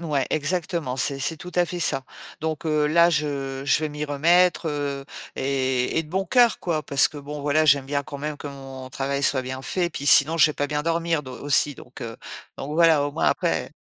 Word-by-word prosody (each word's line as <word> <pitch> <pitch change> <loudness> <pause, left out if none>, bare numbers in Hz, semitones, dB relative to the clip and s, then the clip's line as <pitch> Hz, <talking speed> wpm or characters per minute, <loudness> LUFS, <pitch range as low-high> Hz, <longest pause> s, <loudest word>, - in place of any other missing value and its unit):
Ouais, 150 -5 -1
exactement, 155 -3 -2
c'est 135 +1 +1
c'est 150 +3 -2
tout 180 - -9
à 175 0 +3
fait 175 +1 -6
ça 135 -4 0 0.4
donc 160 0 -3
heu, 150 -1 +2
là, 170 +2 +5
je 140 -4 -2
je 140 - +3
vais 155 - -1
m'y 150 0 -5
remettre, 170 +4 +3
heu, 140 -2 -3 0.3
et 130 -1 -1
et - - +1
de 150 - -15
bon 190 +1 -1
cœur 245 -3 +4
quoi 160 -3 -2
parce 140 -1 +3
que 150 - -13
bon, 145 +1 -7
voilà, 145 +2 +2
j'aime 140 -3 +4
bien 140 0 -1
quand 145 -1 -8
même 150 +1 -4
que 145 - -8
mon 135 -2 -9
travail 140 +1 -2
soit 135 -1 +2
bien 130 +1 -6
fait. 175 +3 -1
Puis 145 - -7
sinon, 150 +4 +6
je 165 - +6
vais 150 - -2
pas 145 - -2
bien 150 +1 -2
dormir 165 -1 0
d 130 - -10
aussi 140 +3 +1
donc 125 - -12
heu 115 -1 -7 0.4
donc 145 +3 -5
voilà, 165 -3 +5
au 145 - -5
moins - - -2
après - - -1
145 Hz, 230 wpm, -24 LUFS, 135-160 Hz, 0.4 s, sinon